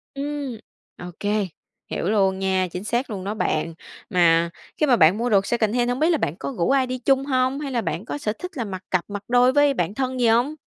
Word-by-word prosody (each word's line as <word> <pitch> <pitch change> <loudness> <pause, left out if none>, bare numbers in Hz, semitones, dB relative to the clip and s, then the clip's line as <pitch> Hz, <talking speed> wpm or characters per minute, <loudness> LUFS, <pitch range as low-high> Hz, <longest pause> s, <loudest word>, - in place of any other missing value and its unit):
Ừm, 280 -4 -4 0.4
OK, 175 -1 -9 0.7
hiểu - - -3
luôn 195 -3 +2
nha. 190 -1 +1
Chính 180 - -5
xác 240 +5 -1
luôn 200 -4 -5
đó 200 +2 -3
bạn. 165 -6 -1 0.4
Mà 170 -2 +4 0.3
khi 305 - +3
mà 255 - +4
bạn 175 -1 +5
mua 240 +2 -1
đồ 200 -3 +4
secondhand, 240 +2 0
hông 245 - -1
biết 315 - +3
là 335 - +3
bạn 160 - -2
có 140 0 -4
rủ 170 - +1
ai 265 -1 +3
đi 255 0 -3
chung 270 +2 +2
hông? 260 0 +1
Hay 285 -2 -4
là 240 - 0
bạn 175 0 -3
có - - -4
sở 215 -7 -2
thích 360 - -6
là 235 - -2
mặc 190 -2 -6
cặp, 185 -2 +1
mặc 205 0 -5
đôi 245 +1 +4
với 290 0 +4
bạn 180 -6 -1
thân 260 0 -2
gì 240 - +3
hông? 245 +7 +2
235 Hz, 240 wpm, -23 LUFS, 190-265 Hz, 0.7 s, bạn